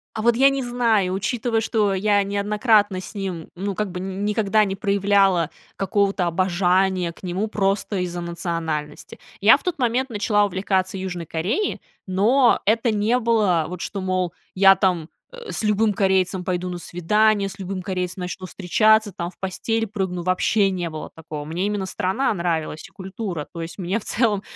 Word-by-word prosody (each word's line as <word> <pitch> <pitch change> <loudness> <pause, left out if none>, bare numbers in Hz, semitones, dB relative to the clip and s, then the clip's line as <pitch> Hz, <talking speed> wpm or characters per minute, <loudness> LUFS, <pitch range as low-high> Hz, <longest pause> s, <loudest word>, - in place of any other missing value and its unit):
А 220 - -2
вот 235 +1 +3
я 270 +2 +6
не 275 -1 -2
знаю, 230 -6 +1
учитывая, 225 +3 -1
что 210 -3 +1
я 205 +1 +2
неоднократно 205 0 +2
с 185 - -10
ним 190 -5 -5
ну 195 +2 -3
как 210 0 -2
бы 180 - -5
ни 195 +2 -3
никогда 215 0 +2
не 195 -1 -3
проявляла 200 -4 +2 0.3
какого-то 195 -1 +1
обожания 185 0 +1
к - - -19
нему 185 +4 -2
просто 200 -1 -1
из-за 175 -1 -3
национальности. 165 -3 -4 0.2
Я - - +7
в - - -17
тот 360 -2 -2
момент 250 +2 +1
начала 210 -1 +2
увлекаться 190 0 -1
Южной 180 -3 -5
Кореей, 190 - -2 0.3
но 230 +7 +3
это 225 +3 +2
не 215 +4 +1
было 215 -9 +2
вот, 180 -1 -6
что, 195 - -4
мол, 185 -2 -1 0.2
я 195 0 +7
там, 175 -5 0 0.2
э, 485 -3 -9
с - - -3
любым 210 0 +2
корейцем 190 -2 +1
пойду 180 0 -2
на 180 - -4
свидание, 205 +5 +1
с 195 - -11
любым 190 0 -4
корейцем 180 0 -3
начну 180 +1 -5
встречаться 215 +3 +3
там, 170 -2 -4
в 180 - -19
постель 225 +4 -1
прыгну, 190 -4 -3
вообще 195 +3 +2
не 175 -2 -3
было 155 -1 -7
такого. 155 -2 -7
Мне 170 +5 -2
именно 205 -2 -2
страна 190 +8 0
нравилась 165 -4 -2
и - - -22
культура, 190 -4 -6
то 170 - -7
есть 165 0 -7
мне, 190 +4 -1
в - - -12
целом 215 -4 +1
195 Hz, 180 wpm, -22 LUFS, 180-215 Hz, 0.3 s, Я